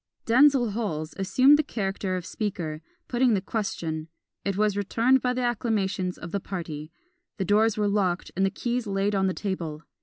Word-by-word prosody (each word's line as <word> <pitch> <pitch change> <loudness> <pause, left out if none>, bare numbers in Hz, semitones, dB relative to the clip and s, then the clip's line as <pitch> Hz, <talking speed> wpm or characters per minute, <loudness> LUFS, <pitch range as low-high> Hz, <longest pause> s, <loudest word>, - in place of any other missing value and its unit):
Denzil 255 -1 +5
Holles 180 -8 -3
assumed 260 +9 +5
the - - +3
character 195 -6 -2
of 180 - -6
Speaker, 175 -9 -3 0.3
putting 245 -2 +3
the - - +1
question: 175 -7 -3 0.4
it 195 -1 -1
was 210 -1 +2
returned 230 +6 +2
by 250 - +1
the 250 0 -1
acclamations 200 -6 -1
of 170 - -8
the 200 - -1
party. 165 -5 -6 0.5
The 190 - -1
doors 215 +2 +3
were 210 -1 +2
locked 190 -3 0
and 190 - +1
the 195 - +3
keys 240 +3 -2
laid 200 +1 0
on 190 -1 +2
the 185 - -1
table. 165 -6 -4
200 Hz, 180 wpm, -26 LUFS, 185-230 Hz, 0.5 s, Denzil